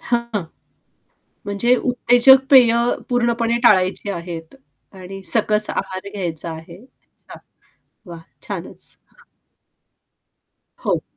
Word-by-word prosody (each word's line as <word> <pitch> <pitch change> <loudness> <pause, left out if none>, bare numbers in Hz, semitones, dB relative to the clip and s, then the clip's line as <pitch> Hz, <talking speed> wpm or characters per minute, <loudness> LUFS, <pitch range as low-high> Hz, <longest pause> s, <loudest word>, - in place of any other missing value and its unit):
हां. 235 -4 -2 1.0
म्हणजे 205 +5 +1
उत्तेजक 250 +2 +4
पेय 250 -4 +7 0.4
पूर्णपणे 235 -1 0
टाळायची 195 -2 +2
आहेत 170 -1 -7 0.4
आणि 195 0 -10
सकस 215 -1 +3
आहार 185 +1 -5
घ्यायचा 170 -5 -5
आहे. 160 +1 -11
अच्छा. 260 - -18 0.7
वाह! 170 -2 -10 0.2
छानच. - - -3
हां. - - -25 1.6
हो. - - 0
210 Hz, 90 wpm, -19 LUFS, 185-240 Hz, 1.6 s, पेय